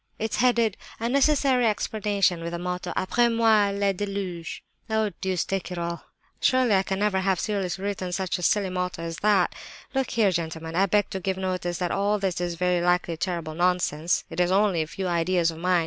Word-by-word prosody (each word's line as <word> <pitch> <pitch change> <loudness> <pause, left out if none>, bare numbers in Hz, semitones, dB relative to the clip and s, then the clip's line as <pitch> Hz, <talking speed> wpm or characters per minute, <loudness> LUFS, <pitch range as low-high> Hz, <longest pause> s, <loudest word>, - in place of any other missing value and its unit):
"It's 220 0 -2
headed, 235 -4 +2 0.2
'A 230 +1 -1
Necessary 270 -2 +3
Explanation,' 205 -4 0
with 170 +1 -5
the - - -2
motto, 180 0 -4
'Après 235 +5 +2
moi 220 -3 +4
le 200 0 0
déluge!' 190 -4 -4 0.3
Oh, 220 -1 +1
deuce 185 -3 0
take 195 -1 -3
it 180 - -4
all! 170 0 -4 0.3
Surely 255 -4 +3
I 190 - +4
can 190 0 -3
never 200 -1 +1
have 190 -2 +1
seriously 195 -3 -2
written 190 -3 -3
such 185 0 -2
a - - -6
silly 195 +2 +2
motto 180 -2 -3
as 165 0 -5
that? 200 -4 +2 0.4
Look 265 -2 0
here, 215 -4 +2
gentlemen, 160 -1 -4
I 195 +2 +3
beg 205 +2 +1
to 190 - -3
give 190 0 -2
notice 185 -2 -2
that 180 -2 -1
all 205 +1 +1
this 190 -3 -2
is 175 -1 -2
very 180 0 +1
likely 175 -1 +1
terrible 170 -2 -3
nonsense. 175 -1 +1
It - - -5
is 180 0 +3
only 195 -3 +3
a 155 - -3
few 190 +4 -5
ideas 170 0 +1
of 160 - -10
mine. 180 0 +2
185 Hz, 205 wpm, -25 LUFS, 175-205 Hz, 0.4 s, moi